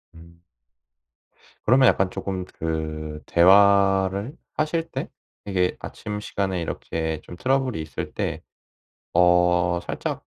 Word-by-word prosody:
음. 85 0 -16 1.3
그러면 130 +2 +6
약간 95 -1 +3
쪼끔 95 -2 -4
그 80 -2 -4
대화를 100 - +4 0.2
하실 165 +2 -1
때 - - -5 0.4
이게 90 -3 0
아침 105 -1 -6
시간에 95 -3 -2
이렇게 80 -1 -3
좀 90 - -10
트러블이 130 -5 0
있을 80 -3 -6
때 - - -3 0.7
어 90 0 +3
살짝 - - -4
90 Hz, 210 characters per minute, -24 LUFS, 85-100 Hz, 1.3 s, 그러면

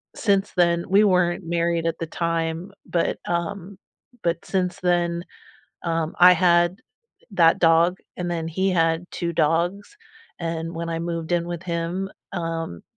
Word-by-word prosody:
since 200 -3 +1
then 170 -1 +2
we 200 +2 +5
weren't 180 -2 +2
married 170 0 0
at 165 - -1
the 165 - -3 0.2
time, 165 +3 -2
but, 170 - 0
um, 180 +2 -3 0.5
but 170 -1 -1
since 185 0 -1
then, 175 -1 +1 0.6
um, 165 -1 -1
I 180 +1 +10
had 175 +1 +3 0.5
that 165 -3 +5
dog, 170 +2 +4 0.2
and 175 -1 -3
then 165 -2 -2
he 190 +4 0
had 165 0 +1
2 170 -1 -2
dogs 175 - 0 0.4
and 165 0 -3
when 170 0 -4
I 165 - -2
moved 170 0 -3
in 170 0 +1
with 175 0 -5
him, 175 +2 -2 0.2
um, 165 - -4
170 Hz, 150 wpm, -23 LUFS, 165-180 Hz, 0.6 s, I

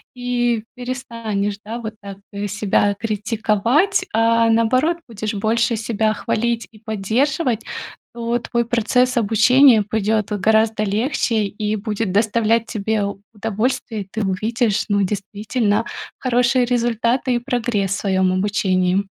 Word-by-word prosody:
и 240 -2 0
перестанешь, 230 -5 -3
да, 225 +3 -5
вот 220 -2 -6
так 200 -1 -8 0.3
себя 205 0 +1
критиковать, 225 - +1
а 230 +1 +3
наоборот 255 +9 +2
будешь 215 -2 -4
больше 225 +3 +1
себя 220 -1 0
хвалить 235 +2 -1
и 215 - -17
поддерживать, 225 - 0 0.5
то 235 0 -1
твой 235 0 -1
процесс 245 +2 +1
обучения 230 +2 +5
пойдёт 215 0 -1
вот 205 -2 -2
гораздо 220 +1 +3
легче 220 +1 0
и 210 +1 -2
будет 210 -1 -2
доставлять 225 +2 +2
тебе 220 -1 -1 0.3
удовольствие. 220 +1 -2
И 195 - -8
ты 220 - -2
увидишь, 215 +3 0
ну, 200 0 +2
действительно 205 +3 -1 0.3
хорошие 250 0 +2
результаты 240 +1 +1
и - - +1
прогресс 235 -6 -1
в 200 - -1
своём 190 -2 +1
обучении. 185 -1 +1
220 Hz, 125 wpm, -20 LUFS, 205-240 Hz, 0.5 s, обучения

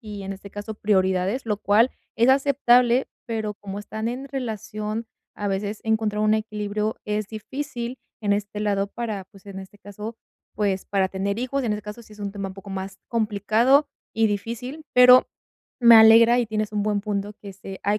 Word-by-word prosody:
y, 210 -4 -8
en 195 0 -5
este 195 +1 -11
caso, 205 +2 -6
prioridades, 190 +3 +1
lo 210 -2 0
cual 215 +5 +3 0.2
es 235 +2 +3
aceptable, 260 -2 +4 0.2
pero 220 -2 -3
como 200 -1 -7
están 220 +2 -5
en 260 +3 -5
relación, 220 -3 -4 0.3
a 205 - -3
veces 200 +2 -3
encontrar 220 -1 0
un 215 0 +4
equilibrio 215 0 -2
es 210 0 -2
difícil 240 +3 -6 0.2
en 205 -2 +1
este 205 0 -4
lado 200 -1 0
para 210 -3 -5
pues, 195 0 -20
en 195 -1 -8
este 190 +2 -12
caso, 210 +3 -8 0.4
pues, 200 -3 -1
para 195 -2 0
tener 200 +2 -2
hijos. 255 +2 -2
En 220 - 0
este 210 0 -4
caso, 210 +3 -8
sí 215 - -17
es 210 - -15
un 200 -1 -4
tema 200 -1 -4
un 190 - -10
poco 195 +1 -11
más 195 0 -6
complicado 225 +5 +2 0.3
y 225 0 +3
difícil, 235 +8 -4
pero 250 0 +8 0.5
me 235 -1 +8
alegra, 225 +2 +7
y 240 - +1
tienes 215 -1 -2
un 210 -1 0
buen 205 -1 0
punto 205 0 -3
que 205 - -12
es 195 0 -17
eh, 195 -1 -7
hay 205 +1 +1
210 Hz, 195 wpm, -24 LUFS, 200-230 Hz, 0.5 s, pero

